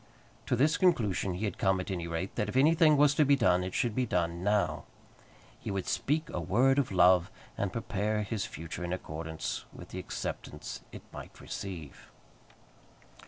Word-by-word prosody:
To -, -, +2 dB
this 150 Hz, +6 st, +3 dB
conclusion 105 Hz, -, +2 dB
he 100 Hz, +5 st, -2 dB
had 100 Hz, -, -4 dB
come 95 Hz, 0 st, +2 dB
at 90 Hz, +2 st, -4 dB
any 85 Hz, -3 st, -3 dB
rate, 85 Hz, +3 st, -3 dB
that 105 Hz, -, -1 dB
if 125 Hz, -, -2 dB
anything 155 Hz, +2 st, +5 dB
was 145 Hz, 0 st, +5 dB
to 150 Hz, -, +4 dB
be 140 Hz, 0 st, +5 dB
done, 90 Hz, -9 st, +3 dB
it 90 Hz, 0 st, -5 dB
should 120 Hz, -3 st, +1 dB
be 125 Hz, +2 st, 0 dB
done 85 Hz, -2 st, -1 dB
now. 100 Hz, -6 st, +1 dB, 0.7 s
He -, -, -6 dB
would 95 Hz, -1 st, -2 dB
speak 155 Hz, +3 st, 0 dB
a -, -, -2 dB
word 130 Hz, -, +3 dB
of 135 Hz, -, 0 dB
love, 90 Hz, -1 st, +5 dB, 0.3 s
and 100 Hz, -2 st, -2 dB
prepare 105 Hz, 0 st, -1 dB
his 105 Hz, 0 st, -2 dB
future 80 Hz, +2 st, -6 dB
in 90 Hz, 0 st, -2 dB
accordance 80 Hz, -2 st, -5 dB
with -, -, -11 dB
the 95 Hz, -, -6 dB
acceptance 90 Hz, -, -6 dB
it -, -, -10 dB
might -, -, -10 dB
receive. 85 Hz, -7 st, -7 dB
100 Hz, 180 wpm, -30 LUFS, 90-130 Hz, 0.7 s, anything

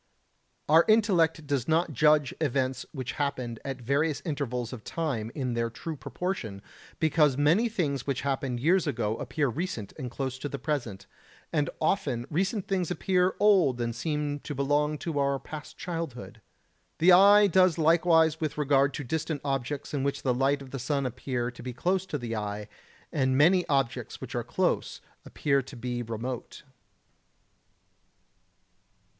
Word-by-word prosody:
Our 160 Hz, +3 st, +6 dB
intellect 180 Hz, -8 st, +3 dB
does 140 Hz, -4 st, -1 dB
not 160 Hz, 0 st, +1 dB
judge 150 Hz, +1 st, +3 dB
events 130 Hz, -3 st, -1 dB
which 130 Hz, -4 st, -4 dB
happened 130 Hz, -5 st, -2 dB
at 135 Hz, -1 st, -5 dB
various 140 Hz, +5 st, 0 dB
intervals 125 Hz, -6 st, -3 dB
of 115 Hz, -4 st, -8 dB
time 125 Hz, -9 st, -3 dB
in 130 Hz, -4 st, -2 dB
their 115 Hz, 0 st, 0 dB
true 160 Hz, +7 st, -6 dB
proportion, 130 Hz, -, -4 dB, 0.4 s
because 150 Hz, -3 st, +3 dB
many 165 Hz, +11 st, +3 dB
things 145 Hz, -, -2 dB
which 135 Hz, -2 st, -1 dB
happened 135 Hz, -3 st, -2 dB
years 170 Hz, +7 st, +3 dB
ago 110 Hz, -2 st, -1 dB
appear 140 Hz, +2 st, -1 dB
recent 130 Hz, -, -4 dB
and 130 Hz, -3 st, -4 dB
close 130 Hz, +1 st, -4 dB
to 145 Hz, -, -4 dB
the 140 Hz, -, -4 dB
present, 125 Hz, -11 st, -3 dB, 0.5 s
and 150 Hz, -3 st, +1 dB
often 140 Hz, -8 st, 0 dB
recent 190 Hz, +5 st, -1 dB
things 185 Hz, -4 st, 0 dB
appear 180 Hz, 0 st, +1 dB
old 185 Hz, -12 st, +4 dB
and 115 Hz, -1 st, -2 dB
seem 150 Hz, +2 st, -2 dB
to 145 Hz, -, -6 dB
belong 145 Hz, +2 st, +1 dB
to 155 Hz, -1 st, -3 dB
our 140 Hz, 0 st, +1 dB
past 150 Hz, +2 st, -9 dB
childhood. 165 Hz, -8 st, -6 dB, 0.6 s
The 175 Hz, +3 st, +5 dB
eye 200 Hz, +3 st, +8 dB
does 185 Hz, -3 st, +4 dB
likewise 160 Hz, -1 st, +4 dB
with 155 Hz, -2 st, -2 dB
regard 140 Hz, -1 st, +2 dB
to 145 Hz, -, -4 dB
distant 155 Hz, +3 st, -2 dB
objects 135 Hz, +1 st, -3 dB
which 140 Hz, -1 st, -1 dB
in -, -, -29 dB
the 130 Hz, -, +2 dB
light 135 Hz, +2 st, +1 dB
of 130 Hz, -, -13 dB
the 135 Hz, -, -4 dB
sun 140 Hz, +2 st, -1 dB
appear 125 Hz, 0 st, -3 dB
to 120 Hz, -, -12 dB
be 125 Hz, 0 st, -5 dB
close 185 Hz, +8 st, 0 dB
to 150 Hz, -, -2 dB
the 120 Hz, -3 st, -4 dB
eye, 105 Hz, -1 st, -4 dB, 0.5 s
and 130 Hz, -1 st, +1 dB
many 175 Hz, +5 st, +4 dB
objects 135 Hz, -5 st, -1 dB
which -, -, -8 dB
are -, -, -1 dB
close -, -, -1 dB, 0.3 s
appear 140 Hz, -2 st, +1 dB
to 135 Hz, +1 st, -11 dB
be 120 Hz, 0 st, -3 dB
remote. 120 Hz, +2 st, -5 dB
140 Hz, 160 wpm, -28 LUFS, 125-160 Hz, 0.6 s, eye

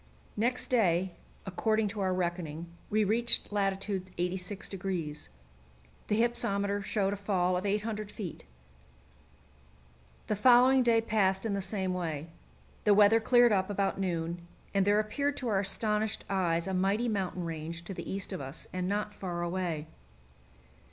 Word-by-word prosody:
Next 240 Hz, +4 st, 0 dB
day, 185 Hz, -6 st, +3 dB, 0.3 s
according 215 Hz, +3 st, +1 dB
to 205 Hz, +1 st, -6 dB
our 190 Hz, -1 st, +1 dB
reckoning, 170 Hz, -3 st, -2 dB, 0.2 s
we 215 Hz, +1 st, +2 dB
reached 230 Hz, +3 st, +3 dB
lat. 195 Hz, -2 st, +1 dB
86°. 185 Hz, -3 st, -4 dB, 0.8 s
The 210 Hz, -, +1 dB
hypsometer 200 Hz, -4 st, +1 dB
showed 195 Hz, -1 st, 0 dB
a -, -, -2 dB
fall 185 Hz, -3 st, 0 dB
of 185 Hz, +3 st, -1 dB
800 210 Hz, +1 st, -2 dB
feet. 185 Hz, -8 st, -7 dB, 1.8 s
The 210 Hz, -, -1 dB
following 250 Hz, +4 st, +6 dB
day 230 Hz, -2 st, +4 dB
passed 200 Hz, -3 st, +1 dB
in 215 Hz, -, 0 dB
the 200 Hz, -, -1 dB
same 190 Hz, -1 st, -2 dB
way. 165 Hz, -3 st, -3 dB, 0.5 s
The 205 Hz, -1 st, +5 dB
weather 210 Hz, +2 st, +6 dB
cleared 240 Hz, +1 st, +5 dB
up 190 Hz, -1 st, +1 dB
about 200 Hz, -1 st, 0 dB
noon, 170 Hz, -2 st, -2 dB, 0.3 s
and 195 Hz, -1 st, +2 dB
there 205 Hz, +1 st, +4 dB
appeared 280 Hz, +7 st, -1 dB
to 250 Hz, -, -2 dB
our 200 Hz, -3 st, +2 dB
astonished 210 Hz, +2 st, 0 dB
eyes 170 Hz, -4 st, 0 dB
a 190 Hz, -, -3 dB
mighty 195 Hz, +6 st, +1 dB
mountain 190 Hz, -4 st, -2 dB
range 165 Hz, +1 st, -5 dB
to 195 Hz, -, -6 dB
the -, -, -6 dB
east 195 Hz, 0 st, -4 dB
of 185 Hz, -, -4 dB
us, 135 Hz, +3 st, -7 dB
and 185 Hz, 0 st, -2 dB
not 210 Hz, +1 st, -1 dB
far 175 Hz, -4 st, -4 dB
away. 175 Hz, -3 st, -2 dB
195 Hz, 150 wpm, -30 LUFS, 180-215 Hz, 1.8 s, following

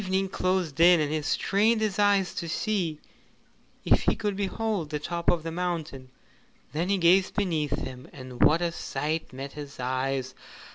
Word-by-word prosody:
Evening 190 Hz, 0 st, 0 dB
closed 185 Hz, -6 st, -1 dB
in, 175 Hz, 0 st, +7 dB
and 150 Hz, -1 st, 0 dB
he 155 Hz, 0 st, 0 dB
strained 210 Hz, +8 st, +2 dB
his 210 Hz, -3 st, -1 dB
eyes 200 Hz, -2 st, +3 dB
to 170 Hz, -, -4 dB
see 175 Hz, -5 st, -1 dB, 0.9 s
if -, -, +4 dB
he -, -, +1 dB
could 205 Hz, -3 st, -2 dB
behold 200 Hz, -3 st, -2 dB
the 150 Hz, -, -2 dB
top 170 Hz, +3 st, -2 dB
of 170 Hz, -3 st, +1 dB
the 165 Hz, -, -4 dB
mountain. 165 Hz, -7 st, -4 dB, 0.6 s
Then 170 Hz, +5 st, -1 dB
he 200 Hz, -, +2 dB
gazed 185 Hz, +2 st, +4 dB
beneath 160 Hz, -8 st, 0 dB
him, 130 Hz, 0 st, -7 dB
and 130 Hz, -2 st, -9 dB
what 165 Hz, +3 st, +5 dB
a 170 Hz, -, 0 dB
sight 160 Hz, -1 st, -3 dB
met 135 Hz, +2 st, -7 dB
his 145 Hz, -2 st, -9 dB
eyes! 130 Hz, +1 st, -2 dB
170 Hz, 175 wpm, -27 LUFS, 145-190 Hz, 0.9 s, in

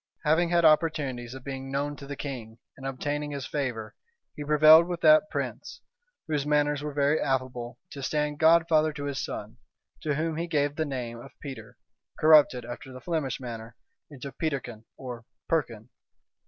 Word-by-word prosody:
Having 165 Hz, +3 st, +3 dB
had 170 Hz, -1 st, +3 dB
opportunities 140 Hz, -6 st, +2 dB
of 130 Hz, -, -10 dB
being 135 Hz, -1 st, -6 dB
known 145 Hz, +1 st, -1 dB
to 140 Hz, -, -10 dB
the 145 Hz, -, -5 dB
king, 120 Hz, -6 st, -6 dB, 0.2 s
and 135 Hz, 0 st, -7 dB
obtaining 145 Hz, +3 st, -3 dB
his 140 Hz, -2 st, -5 dB
favor, 125 Hz, -7 st, -3 dB, 0.4 s
he 150 Hz, -, -5 dB
prevailed 155 Hz, +3 st, +7 dB
with 175 Hz, -1 st, -3 dB
that 155 Hz, +6 st, +6 dB
prince, -, -, -5 dB, 0.5 s
whose 150 Hz, -3 st, 0 dB
manners 150 Hz, 0 st, +1 dB
were 150 Hz, 0 st, -4 dB
very 145 Hz, +2 st, +2 dB
affable, 125 Hz, -2 st, -2 dB
to 140 Hz, -, -7 dB
stand 150 Hz, +1 st, -1 dB
godfather 160 Hz, -1 st, +4 dB
to 145 Hz, -1 st, -6 dB
his 140 Hz, -2 st, -3 dB
son, -, -, -6 dB, 0.4 s
to 150 Hz, -2 st, -1 dB
whom 160 Hz, +1 st, -1 dB
he 170 Hz, +1 st, -2 dB
gave 145 Hz, -3 st, 0 dB
the 160 Hz, -, -1 dB
name 125 Hz, -4 st, -5 dB
of 135 Hz, +3 st, -13 dB
Peter, 140 Hz, -3 st, -9 dB, 0.4 s
corrupted, 150 Hz, -6 st, +6 dB
after 120 Hz, +2 st, -8 dB
the 130 Hz, -, -9 dB
Flemish 155 Hz, -5 st, -2 dB
manner, 115 Hz, -2 st, -7 dB, 0.3 s
into 140 Hz, -1 st, -8 dB
Peterkin, 130 Hz, -9 st, -4 dB
or 125 Hz, -3 st, -7 dB, 0.2 s
Perkin. 120 Hz, -9 st, -1 dB
145 Hz, 170 wpm, -27 LUFS, 130-155 Hz, 0.5 s, prevailed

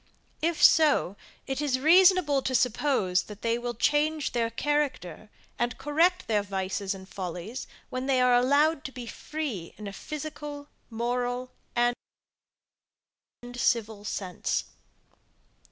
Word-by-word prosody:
If 330 Hz, 0 st, 0 dB
so, 295 Hz, -, +5 dB, 0.3 s
it 270 Hz, +1 st, -3 dB
is 280 Hz, -3 st, +1 dB
reasonable 335 Hz, -1 st, +5 dB
to 260 Hz, 0 st, -1 dB
suppose, 230 Hz, -6 st, +2 dB
that 210 Hz, -1 st, -11 dB
they 230 Hz, 0 st, +1 dB
will 240 Hz, 0 st, -4 dB
change 300 Hz, +5 st, +1 dB
their 230 Hz, -1 st, 0 dB
character, 255 Hz, -, -2 dB, 0.3 s
and 240 Hz, +1 st, -1 dB
correct 320 Hz, +6 st, +2 dB
their 210 Hz, -2 st, +1 dB
vices 195 Hz, 0 st, -3 dB
and 190 Hz, 0 st, -11 dB
follies, 190 Hz, +6 st, -6 dB, 0.2 s
when 255 Hz, +1 st, -3 dB
they 265 Hz, -2 st, +3 dB
are 250 Hz, 0 st, +4 dB
allowed 285 Hz, +5 st, +3 dB
to 265 Hz, -, -5 dB
be 250 Hz, -2 st, -7 dB
free 240 Hz, -, -5 dB
in 215 Hz, -, -8 dB
a 200 Hz, -, -6 dB
physical, 295 Hz, +2 st, -7 dB, 0.2 s
moral, 245 Hz, +2 st, -2 dB, 0.2 s
and 240 Hz, 0 st, +2 dB, 1.6 s
civil 225 Hz, -4 st, 0 dB
sense. 190 Hz, -3 st, -2 dB
250 Hz, 125 wpm, -27 LUFS, 215-295 Hz, 1.6 s, so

